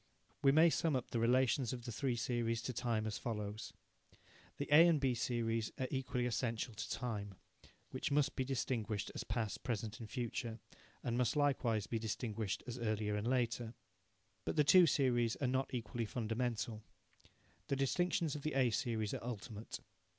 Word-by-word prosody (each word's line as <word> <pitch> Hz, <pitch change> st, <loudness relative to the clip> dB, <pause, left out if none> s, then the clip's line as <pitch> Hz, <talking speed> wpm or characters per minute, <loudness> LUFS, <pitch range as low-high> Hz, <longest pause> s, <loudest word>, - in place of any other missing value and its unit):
We 135 Hz, -2 st, +6 dB
may 160 Hz, +3 st, +6 dB
sum 160 Hz, -3 st, +1 dB
up 125 Hz, -, -2 dB
the 115 Hz, -, 0 dB
relations 125 Hz, +1 st, +3 dB
of 120 Hz, -1 st, -6 dB
the 120 Hz, -, -4 dB
three 125 Hz, +2 st, 0 dB
series 115 Hz, -1 st, -1 dB
to 125 Hz, -, -3 dB
time 115 Hz, -3 st, 0 dB
as 110 Hz, -1 st, -3 dB
follows: 110 Hz, -1 st, -4 dB, 0.9 s
The -, -, -3 dB
A 160 Hz, +4 st, +9 dB
and 165 Hz, -3 st, +4 dB
B 135 Hz, -2 st, +2 dB
series 115 Hz, -2 st, -1 dB
are 130 Hz, -, -1 dB
equally 125 Hz, -2 st, -1 dB
essential 115 Hz, -1 st, -1 dB
to 105 Hz, -, -5 dB
time, 105 Hz, -5 st, -3 dB, 0.6 s
which -, -, -2 dB
must 145 Hz, 0 st, +2 dB
be 130 Hz, -, 0 dB
distinguished 120 Hz, -5 st, -2 dB
as -, -, -4 dB
past, 110 Hz, -2 st, -2 dB
present 115 Hz, -2 st, -3 dB
and 110 Hz, -2 st, -8 dB
future, 120 Hz, -1 st, -3 dB, 0.5 s
and 120 Hz, 0 st, 0 dB
must 125 Hz, -, +2 dB
likewise 130 Hz, -7 st, +2 dB
be 115 Hz, -, -2 dB
distinguished 110 Hz, -2 st, -2 dB
as 125 Hz, 0 st, -5 dB
earlier 110 Hz, -2 st, 0 dB
and 105 Hz, +2 st, -2 dB
later. 120 Hz, -2 st, 0 dB, 0.7 s
But -, -, -2 dB
the 150 Hz, -, +5 dB
two 175 Hz, +4 st, +7 dB
series 120 Hz, -6 st, +2 dB
are 140 Hz, -, -2 dB
not 130 Hz, +2 st, 0 dB
equally 120 Hz, -1 st, -3 dB
fundamental. 115 Hz, -1 st, -2 dB, 0.9 s
The 140 Hz, -, +1 dB
distinctions 160 Hz, +3 st, +1 dB
of 150 Hz, -, -5 dB
the 155 Hz, -1 st, -2 dB
A 130 Hz, -3 st, +4 dB
series 110 Hz, -4 st, -1 dB
are -, -, -4 dB
ultimate. 115 Hz, -2 st, -6 dB
120 Hz, 170 wpm, -37 LUFS, 110-130 Hz, 0.9 s, A